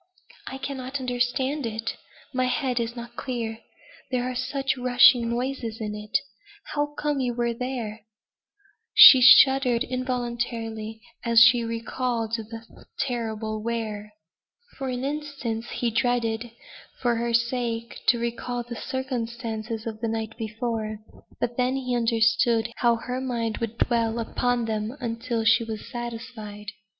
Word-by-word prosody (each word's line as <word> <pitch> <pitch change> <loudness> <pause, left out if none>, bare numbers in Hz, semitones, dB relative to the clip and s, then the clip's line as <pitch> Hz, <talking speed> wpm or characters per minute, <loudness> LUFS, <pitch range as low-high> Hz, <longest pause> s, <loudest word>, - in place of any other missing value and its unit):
"I 265 - -5
cannot 270 0 -4
understand 255 +2 -1
it. 225 0 -4 0.4
My 255 0 +1
head 250 0 0
is 235 +1 -2
not 235 0 -8
clear. 230 -4 -4 0.5
There 250 -2 0
are 255 0 -2
such 270 +2 -1
rushing 245 -1 +5
noises 240 -2 -3
in 210 -2 -3
it. 210 0 -1 0.6
How 295 0 -1
came 295 -2 0
you 245 -2 -1 0.2
there?" 230 -3 -4 0.9
She 260 - +11
shuddered 260 -1 +7
involuntarily 235 -3 -3 0.2
as 235 -1 +5
she 235 0 +7
recalled 230 0 -2
the 225 0 -9
terrible 220 -4 -2
where. 215 -2 -4 0.7
For 270 -1 -2
an 250 0 -3
instant 275 -6 -3
he 240 -1 -2
dreaded, 235 0 0 0.5
for 240 -2 +1
her 235 +1 -1
sake, 235 -1 -1
to 240 - +5
recall 240 +1 -3
the 235 0 -7
circumstances 230 -3 -4
of 220 -1 -6
the 230 - 0
night 225 0 -3
before; 220 -1 -3 0.4
but 240 0 -2
then 250 +1 +1
he 255 -2 -1
understood 230 0 +2
how 235 -1 +3
her 250 +2 -4
mind 235 -4 -2
would 230 0 -4
dwell 230 -2 +1
upon 240 +1 0
them 220 +3 -3
until 230 -1 -2
she 225 +1 +5
was 220 -2 -6
satisfied. 230 -4 -7
235 Hz, 135 wpm, -25 LUFS, 225-250 Hz, 0.9 s, She